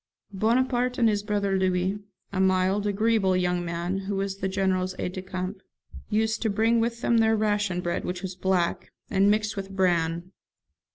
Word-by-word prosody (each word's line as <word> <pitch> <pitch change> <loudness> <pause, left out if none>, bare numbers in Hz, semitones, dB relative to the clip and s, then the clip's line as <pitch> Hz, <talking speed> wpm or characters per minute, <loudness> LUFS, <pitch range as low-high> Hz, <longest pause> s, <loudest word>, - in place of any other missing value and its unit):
Bonaparte 245 +4 +1
and 235 - +4
his 205 -2 +1
brother 205 -2 0
Louis 185 +2 0 0.3
(a 190 - -1
mild, 190 +2 +2
agreeable 205 -2 +2
young 180 -1 0
man, 175 +3 -2
who 195 +1 -4
was 195 0 -2
the 190 - -2
General's 190 -1 0
aide 180 - -3
de 185 - -5
camp) 185 +1 -5 0.5
used 220 0 0
to 225 - +1
bring 225 +3 +2
with 235 +1 -1
them 235 -1 +3
their 220 0 +4
ration 205 -4 0
bread, 175 -1 -2
which 180 +1 -4
was 190 -1 -4
black, 180 -2 0 0.2
and 195 +1 +4
mixed 215 0 +1
with 195 -1 -5
bran. 175 -2 0
195 Hz, 175 wpm, -26 LUFS, 185-215 Hz, 0.5 s, and